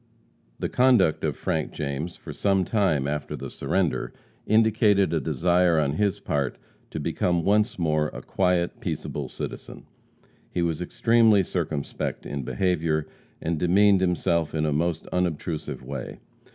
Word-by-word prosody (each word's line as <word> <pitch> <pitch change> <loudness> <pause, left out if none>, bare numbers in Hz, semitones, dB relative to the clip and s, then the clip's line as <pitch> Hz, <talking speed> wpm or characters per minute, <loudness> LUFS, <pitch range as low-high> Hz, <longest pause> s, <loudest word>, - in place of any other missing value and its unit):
The - - -2
conduct 120 -11 +3
of - - -1
Frank 80 -1 -2
James 75 +3 -4
for - - -9
some 95 -2 +1
time 85 -11 +1
after 75 0 -3
the - - -7
surrender 95 -4 -1 0.3
indicated 110 -3 +3
a 80 - +2
desire 85 +4 +2
on 70 -2 +1
his 100 +3 0
part 70 -3 -2 0.3
to - - -5
become 85 -2 0
once 105 +4 +2
more 75 -3 +1
a - - -8
quiet, 90 -2 0
peaceable - - -4
citizen. - - -7 0.6
He 85 - -1
was 85 0 -1
extremely 110 +2 +4
circumspect 80 -5 -3
in 70 - -4
behavior, 80 0 0 0.4
and 80 -1 -1
demeaned 95 +3 +4
himself 85 -3 +1
in 80 0 +1
a 75 - +1
most 80 +1 -1
unobtrusive 85 -5 -2
way. 65 -1 -6
85 Hz, 140 wpm, -25 LUFS, 75-95 Hz, 0.6 s, extremely